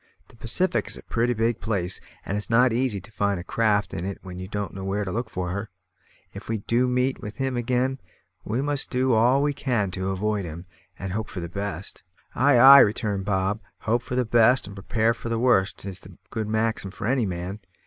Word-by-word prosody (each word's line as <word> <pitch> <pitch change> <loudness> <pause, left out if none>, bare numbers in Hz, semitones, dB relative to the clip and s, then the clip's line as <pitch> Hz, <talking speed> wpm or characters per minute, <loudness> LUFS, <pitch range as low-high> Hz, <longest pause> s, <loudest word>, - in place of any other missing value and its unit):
The - - -17
Pacific 115 +12 -1
is - - -5
a - - -12
pretty 120 +1 0
big 115 0 0
place, 95 -5 -2 0.2
and 100 - -2
it's 105 - -4
not 125 +2 +5
so - - -1
easy 120 -5 0
to 100 - -13
find 100 -3 0
a - - -6
craft 105 0 +1
in 85 - -4
it 95 +1 -4
when 90 -1 -8
you 95 - -6
don't 105 -2 -4
know 95 - -6
where 100 +2 -1
to 95 - -4
look 115 +3 -3
for 90 -3 -3
her. 100 +4 -4 0.6
If - - -10
we 115 - 0
do 120 +5 +1
meet 125 +1 0
with 105 0 -7
him 135 -1 -2
again, 125 +2 0 0.4
we 120 +6 -1
must 145 -1 -1
do 130 0 +1
all 125 +5 +4
we 145 0 +1
can 120 -9 -1
to 95 +1 -2
avoid 100 +1 -1
him, 85 +1 -7 0.3
and 95 -1 -5
hope 110 +1 -3
for 90 - -6
the 85 - -4
best." 100 0 -5 0.3
"Ay, 140 +1 +4
ay," 135 +3 +10
returned 105 -3 +2
Bob, 100 +1 0 0.3
"`hope 115 +2 +2
for 125 - -5
the 125 0 +1
best 120 +3 +5
and 100 0 -9
prepare 110 +3 +1
for 115 - -7
the 115 - 0
worst' 100 -6 +2
is 95 -2 -7
a - - -12 0.2
good 110 -2 -3
maxim 110 -2 -1
for 95 - -7
any 120 -2 +1
man. 90 +3 -5
110 Hz, 230 wpm, -25 LUFS, 95-120 Hz, 0.6 s, ay